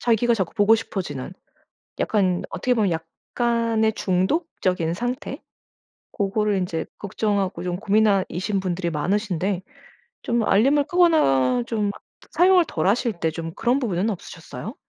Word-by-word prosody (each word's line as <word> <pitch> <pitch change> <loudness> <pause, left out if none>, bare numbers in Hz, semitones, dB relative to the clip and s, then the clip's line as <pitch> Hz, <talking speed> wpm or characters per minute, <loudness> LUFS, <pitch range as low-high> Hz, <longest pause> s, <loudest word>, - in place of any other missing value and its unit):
자기가 235 0 +2
자꾸 190 -6 -2
보고 205 +2 +5
싶어지는 185 - -4 0.7
약간 185 -4 +1
어떻게 250 - 0
보면 215 -5 +2
약간의 220 +7 -1
중독적인 185 - 0
상태 250 - -4 0.7
고거를 205 0 0
인제 175 -3 -2
걱정하고 200 -2 -1
좀 180 -1 -2
고민하 200 0 +3
이신 195 +3 -2
분들이 175 -2 -2
많으신데 185 +3 -1 0.6
좀 235 -2 0
알림을 275 +8 +3
끄거나 135 - +3
좀 210 -3 -1 0.4
사용을 360 0 +5
덜 155 - -2
하실 230 +3 +2
때 160 -1 0
좀 165 0 -5
그런 245 +3 +1
부분은 200 -3 0
없으셨어요? 190 - -8
200 Hz, 300 characters per minute, -23 LUFS, 180-230 Hz, 0.7 s, 보고